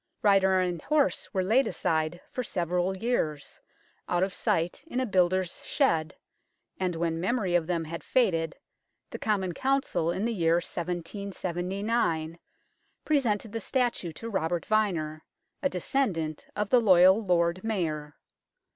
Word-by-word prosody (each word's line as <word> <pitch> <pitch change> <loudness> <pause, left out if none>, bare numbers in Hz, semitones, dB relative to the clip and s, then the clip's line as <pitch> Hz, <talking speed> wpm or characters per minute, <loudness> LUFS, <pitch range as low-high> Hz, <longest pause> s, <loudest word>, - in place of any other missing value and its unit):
Rider 190 -2 +4
and 180 -3 -1
horse 300 -1 +1
were 190 -3 0
laid 225 +7 +3
aside 165 -3 -1
for 250 - -3
several 180 -1 -1
years, 175 -10 -2 0.5
out 175 +1 +2
of 190 0 -1
sight 165 +2 -1
in 255 - -2
a 260 - +1
builder's 185 -3 +1
shed, 155 -1 +1 0.6
and 180 -2 -1
when 165 0 -1
memory 195 -2 0
of 170 -2 +2
them 170 -2 0
had 165 +1 -6
faded, 165 -10 +1 0.6
the - - -6
Common 190 -4 0
Council, 265 -9 0
in 185 +5 -1
the 235 - 0
year 165 -4 +2
1779, 175 0 -2 0.7
presented 230 -8 +1
the 225 +1 -4
statue 240 -8 0
to 230 - -7
Robert 175 -5 -1
Vyner, 170 -8 0 0.4
a 280 - +2
descendant 180 - -1
of 210 0 -2
the 250 - +7
loyal 190 +1 +6
Lord 175 -1 +1
Mayor. 155 -9 -2
185 Hz, 140 wpm, -28 LUFS, 170-215 Hz, 0.7 s, the